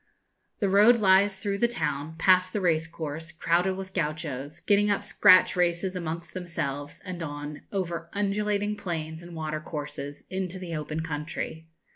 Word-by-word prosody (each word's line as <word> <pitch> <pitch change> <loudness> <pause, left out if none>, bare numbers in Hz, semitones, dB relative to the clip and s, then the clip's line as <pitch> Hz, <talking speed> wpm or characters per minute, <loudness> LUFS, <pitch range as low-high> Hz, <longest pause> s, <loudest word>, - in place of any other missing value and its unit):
The 200 - +1
road 210 +5 +6
lies 195 -1 +4
through 200 0 -2
the 235 - +4
town, 160 -9 -2
past 185 0 +4
the 210 - 0
race 165 -3 +2
course, 160 0 -6
crowded 175 +3 +1
with 190 0 -7
Gauchos, 150 -4 -3
getting 205 0 +3
up 200 - +1
scratch 185 -3 +6
races 180 +1 +1
amongst 165 -1 -4
themselves, 145 -6 -4
and 180 -2 -5
on, 145 -1 -5
over 170 -4 -3
undulating 205 +1 0
plains 160 -4 -4
and 170 0 -10
water 155 -1 -3
courses, 145 -2 -6
into 190 -1 -3
the 175 -3 -5
open 155 +1 -3
country. 160 +1 -4
170 Hz, 155 wpm, -27 LUFS, 155-190 Hz, -, road